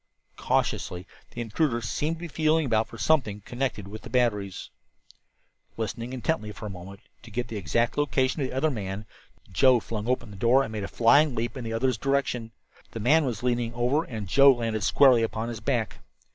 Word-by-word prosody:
Cautiously 90 +1 -1 0.2
the 120 - -6
intruder 120 +2 0
seemed 150 +7 -2
to - - -13
be 175 - -5
feeling 155 0 +1
about 115 -3 +1
for - - -11
something 130 -10 +1
connected 120 -3 -3
with 110 +2 -9
the - - -10
batteries. 105 -6 -1 1.1
Listening 115 +2 -4
intently 130 -3 -2
for 105 - -9
a 105 - -5
moment, 95 +3 -10 0.2
to 115 - -13
get 120 +2 -3
the 115 - -6
exact 115 - 0
location 135 -1 +1
of 130 - -1
the - - -7
other 155 +4 +1
man, 100 -3 -5 0.5
Joe 125 +6 +5
flung 110 -1 -5
open 125 -3 -1
the 100 - -10
door 120 +6 +4
and 110 - -6
made 105 -2 -4
a - - -3
flying 140 +4 +4
leap 120 +1 -2
in 130 - -6
the 115 0 -4
other's 120 0 0
direction. 135 -4 -1 0.4
The 115 - -5
man 150 +8 +4
was 120 -4 -3
leaning 120 -2 0
over, 125 +6 +1
and 110 -8 -6
Joe 140 +8 +7
landed 115 -3 -2
squarely 130 -1 +5
upon 115 +1 -2
his 115 -2 -5
back. 115 -3 -2
120 Hz, 200 wpm, -26 LUFS, 110-135 Hz, 1.1 s, Joe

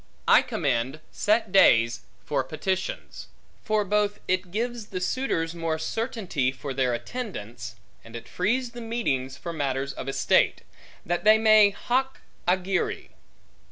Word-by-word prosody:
I - - +7
commend 130 +2 -1
set 215 -1 +1
days 115 -11 +5 0.2
for - - 0
petitions; 190 -1 -4 0.4
for 215 -1 +1
both 205 +1 0
it 185 0 0
gives 230 +2 -3
the 185 -3 -4
suitors 180 -6 -1
more 165 -2 -2
certainty 180 - -2
for 135 +1 -6
their 130 -2 +1
attendance, 120 - -6 0.3
and 115 0 -12
it 115 - -8
frees 235 +7 -1
the 240 0 -9
meetings 135 - -2
for 170 +2 -6
matters 140 -2 -2
of 135 - -6
estate, 135 - +2 0.4
that 175 +1 -1
they 215 +1 +7
may 215 -2 +6
hoc 260 +6 -1 0.3
agere. 185 +1 0
185 Hz, 135 wpm, -26 LUFS, 135-215 Hz, 0.4 s, I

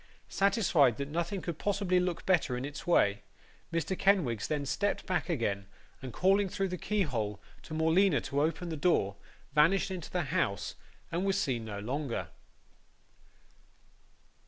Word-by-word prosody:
Satisfied 180 - +3
that 140 0 -4
nothing 170 +5 -2
could 170 -3 -4
possibly 195 -3 +1
look 180 -2 -2
better 160 -9 +2
in 125 - -3
its 145 +5 -8
way, 100 -12 +3 0.5
Mr. 165 +3 -1
Kenwigs 170 - +2
then 150 -2 -1
stepped 175 +9 -1
back 185 - -1
again, 100 - -1 0.3
and 130 -2 -6
calling 195 - +3
through 195 +1 -1
the 180 - -3
keyhole 125 - -1 0.2
to 155 - -7
Morleena 160 0 +3
to 140 +1 -1
open 165 +3 -1
the 160 - -3
door, 145 - +2 0.4
vanished 170 +7 +4
into 180 -4 -5
the 180 -1 -1
house, 100 -1 0 0.4
and 170 +3 -1
was 195 0 +1
seen 125 - -1
no 105 -2 -5
longer. 125 +5 -3
160 Hz, 150 wpm, -31 LUFS, 130-190 Hz, 0.5 s, vanished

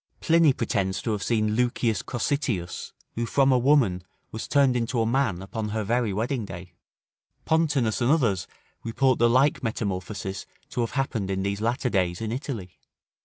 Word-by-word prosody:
Pliny 165 -2 +4
pretends 95 -6 -1
to 115 - -1
have 105 -2 -2
seen 110 -1 +1
Lucius 120 -3 +1
Cossitius, 120 - -2 0.2
who 115 0 -2
from 135 +1 +3
a 130 - +4
woman 120 -9 +3 0.3
was 110 - -5
turned 140 -3 +3
into 120 0 0
a 115 - +2
man 115 -7 0
upon 105 +2 -4
her 110 +1 -2
very 115 +1 0
wedding 115 +5 -1
day. 90 -2 -9 0.7
Pontanus 145 -9 +1
and 120 - +2
others 120 - +2 0.4
report 130 +3 +1
the 120 0 +5
like 130 +4 +3
metamorphosis 95 -3 -4 0.2
to 120 - -2
have 115 - -2
happened 120 -8 -1
in 95 0 -1
these 100 +1 -2
latter 120 +2 0
days 90 -3 0
in 110 -1 -3
Italy. 115 -8 -5
115 Hz, 170 wpm, -26 LUFS, 100-130 Hz, 0.7 s, the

